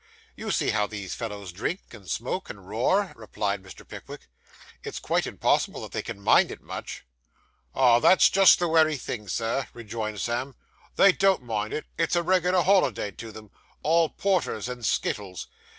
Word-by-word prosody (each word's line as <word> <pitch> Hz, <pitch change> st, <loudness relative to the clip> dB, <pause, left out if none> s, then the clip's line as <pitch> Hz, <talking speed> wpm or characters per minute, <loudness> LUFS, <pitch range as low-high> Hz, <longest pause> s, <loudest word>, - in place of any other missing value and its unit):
'You -, -, -6 dB
see -, -, +1 dB
how 105 Hz, -, +1 dB
these 100 Hz, -3 st, -6 dB
fellows 105 Hz, -5 st, -6 dB
drink, 110 Hz, -, -3 dB
and 100 Hz, -6 st, -12 dB
smoke, 130 Hz, -, -3 dB
and 100 Hz, -2 st, -10 dB
roar,' 180 Hz, -, +1 dB
replied 105 Hz, -3 st, -3 dB
Mr. 95 Hz, -1 st, -13 dB
Pickwick. -, -, -10 dB, 0.6 s
'It's -, -, -6 dB
quite -, -, 0 dB
impossible -, -, 0 dB
that -, -, -8 dB
they -, -, -2 dB
can -, -, -7 dB
mind 100 Hz, -, +4 dB
it -, -, -8 dB
much.' -, -, -8 dB, 0.7 s
'Ah, 125 Hz, -3 st, +5 dB
that's 185 Hz, -, +6 dB
just 195 Hz, -1 st, +6 dB
the 175 Hz, -, 0 dB
wery 160 Hz, -2 st, +3 dB
thing, 115 Hz, -4 st, -6 dB
Sir,' 115 Hz, +6 st, -1 dB
rejoined 110 Hz, -2 st, -5 dB
Sam, 120 Hz, +4 st, -2 dB, 0.4 s
'they 195 Hz, -, +7 dB
don't 190 Hz, -5 st, +2 dB
mind 110 Hz, -3 st, -3 dB
it; 155 Hz, -, -4 dB
it's 165 Hz, -, +1 dB
a 175 Hz, -, +2 dB
reg'lar 180 Hz, 0 st, +2 dB
holiday 160 Hz, -, +2 dB
to 115 Hz, +3 st, -9 dB
them 110 Hz, -1 st, -12 dB, 0.3 s
all 165 Hz, +1 st, +3 dB
porter 195 Hz, -3 st, 0 dB
and 125 Hz, -1 st, -6 dB
skittles. 100 Hz, -4 st, -2 dB
120 Hz, 170 wpm, -26 LUFS, 105-170 Hz, 0.7 s, they